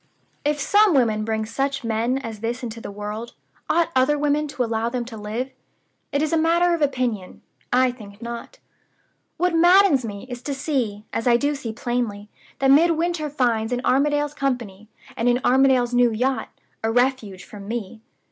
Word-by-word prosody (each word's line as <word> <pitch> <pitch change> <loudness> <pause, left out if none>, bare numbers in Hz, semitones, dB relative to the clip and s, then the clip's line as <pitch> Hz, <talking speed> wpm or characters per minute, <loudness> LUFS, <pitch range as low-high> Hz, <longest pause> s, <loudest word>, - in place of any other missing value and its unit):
"If 295 0 0
some 410 +3 +4
women 220 -5 +2
bring 220 0 -1
such 270 +4 -2
men 230 +3 0
as 230 -5 -6
this 235 +4 -3
into 230 -1 -6
the - - -7
world, 210 +3 -6 0.3
ought 335 0 +2
other 260 +3 +3
women 295 +1 +1
to 270 -3 -2
allow 225 0 -1
them 245 -1 -3
to 230 -1 -9
live? 220 +5 -4 0.6
It 285 +1 +1
is 310 - -1
a 325 - +3
matter 340 +2 +3
of 335 - -1
opinion. 250 -9 -2 0.3
I 255 0 +4
think 205 -4 -13
not. 235 - -7 0.8
"What 360 +1 +1
maddens 345 -4 +5
me 205 0 -6
is 245 -1 -7
to 280 +1 -4
see, 245 -8 -2
as 230 - -1
I 240 -1 +5
do 285 +4 0
see 275 -6 -5
plainly, 220 -3 -3 0.3
that 270 0 +3
Midwinter 330 +1 +3
finds 240 -5 0
in 245 +1 -2
Armadale's 290 +2 +2
company, 235 -8 -3 0.3
and 235 +2 +1
in 245 0 +2
Armadale's 255 -1 +4
new 245 -1 +4
yacht, 255 +4 -1 0.3
a 225 - 0
refuge 245 -6 0
from 200 -2 -11
me. 220 -1 -5
250 Hz, 175 wpm, -23 LUFS, 225-290 Hz, 0.8 s, maddens